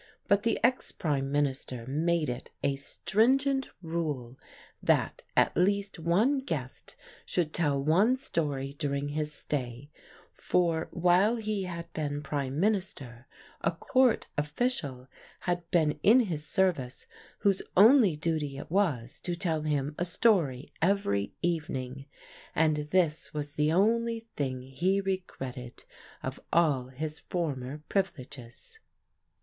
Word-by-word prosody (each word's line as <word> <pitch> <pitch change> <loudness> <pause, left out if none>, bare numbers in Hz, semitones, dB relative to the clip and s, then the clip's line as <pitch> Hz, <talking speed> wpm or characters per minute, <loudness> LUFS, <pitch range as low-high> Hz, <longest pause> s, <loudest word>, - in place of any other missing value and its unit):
But 200 0 +4
the 230 +2 +1
ex 250 +2 +2
Prime 140 -4 -1
Minister 135 -4 -1
made 160 +4 +1
it 120 0 -5
a 140 - +2
stringent 265 - +1
rule 150 -7 -3 0.5
that - - +1 0.2
at - - +4
least 200 +1 +1
one 205 - +2
guest 150 - -5 0.3
should 165 -4 -1
tell 145 -5 +1
one 185 - +3
story 145 - -2
during 140 -1 -1
his 150 +1 -2
stay, 135 -2 -4 0.4
for 170 -2 +1
while 180 +6 +3
he 215 -4 -2
had 170 -2 -7
been 145 -1 -3
Prime 140 -1 -2
Minister 165 - -1 0.3
a - - +2
Court 245 +8 +2
official 145 - -1 0.3
had 175 -1 -2
been 155 -3 +2
in 235 +5 +6
his 160 -9 -3
service 170 -10 0 0.4
whose 200 -2 +2 0.2
only 215 - +7
duty 150 -3 -2
it 145 - -8
was 150 - 0
to 175 - -3
tell 165 -3 -1
him 145 -1 -1
a - - +2
story 170 - +1
every 160 - +1
evening, 135 -5 -2 0.5
and 155 -1 +3
this 165 -4 +1
was 145 -1 -4
the 150 +1 +1
only 230 +5 +2
thing 130 -3 -2
he 170 +10 0
regretted 135 -11 -5 0.4
of - - -4
all 145 -7 +3
his 150 +4 -5
former 150 -4 -3
privileges. 145 - -4
160 Hz, 125 wpm, -29 LUFS, 140-190 Hz, 0.5 s, only